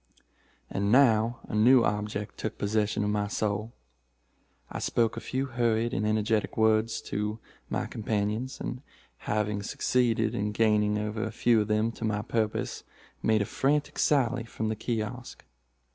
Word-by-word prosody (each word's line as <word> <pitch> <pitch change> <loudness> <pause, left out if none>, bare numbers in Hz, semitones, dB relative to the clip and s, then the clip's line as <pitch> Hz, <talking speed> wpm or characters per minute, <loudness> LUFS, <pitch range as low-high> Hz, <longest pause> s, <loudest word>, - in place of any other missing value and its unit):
"And 100 +1 -1
now 115 -2 +4
a - - -10
new 120 +4 +6
object 105 0 -2
took 110 - -4
possession 105 0 0
of 105 - 0
my 105 0 0
soul. 105 +2 -2 1.0
I - - -4
spoke 115 -1 +1
a - - -4
few 130 +3 -2
hurried 120 -2 0
but 100 - -1
energetic 110 0 0
words 110 0 +2
to 105 +1 -3 0.3
my - - -1
companions, 110 +3 -2
and, 125 - -5 0.5
having 105 -1 0
succeeded 115 +2 +1
in 105 +1 -2
gaining 105 -1 +2
over 105 +1 -3
a 110 - -3
few 115 0 +3
of 105 - -2
them 110 +1 +1
to 115 - -9
my 105 -1 0
purpose 110 -2 -2 0.4
made 110 -1 +3
a - - -4
frantic 145 +6 0
sally 130 -5 +2
from 110 -1 -4
the 110 - -1
kiosk. 115 +2 -4
110 Hz, 155 wpm, -28 LUFS, 105-115 Hz, 1.0 s, new